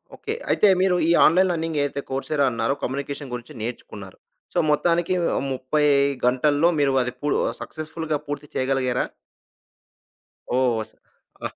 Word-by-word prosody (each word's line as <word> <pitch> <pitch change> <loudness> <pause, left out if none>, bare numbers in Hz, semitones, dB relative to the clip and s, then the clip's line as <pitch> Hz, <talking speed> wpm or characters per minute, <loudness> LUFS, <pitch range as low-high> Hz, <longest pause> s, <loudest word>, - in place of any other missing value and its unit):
Okay. 440 -1 -4 0.2
అయితే 210 - +4
మీరు 185 -1 +3
ఈ - - +5
ఆన్‌లైన్ 185 +3 +4
లర్నింగ్ 165 -2 -2
ఏదైతే 140 0 -2
కోర్సేదో 140 +2 0
అన్నారో 115 +3 0
కమ్యూనికేషన్ 140 +1 -4
గురించి 120 0 -7
నేర్చుకున్నారు. 105 -4 -7 0.4
సో, - - +1
మొత్తానికి 170 +3 +2 0.4
30 130 +4 -1 0.4
గంటల్లో 145 +5 +3
మీరు 140 -2 +2
అది 125 0 -2
పూ 145 - -2 0.3
సక్సెస్‌ఫుల్‌గా 155 0 -4
పూర్తి 145 +1 -5
చేయగలిగారా? 130 -1 0 1.5
ఓహ్! 130 -1 +3
వస్ 110 - -7 0.5
ఆహ్, - - -5
145 Hz, 130 wpm, -23 LUFS, 130-160 Hz, 1.5 s, ఈ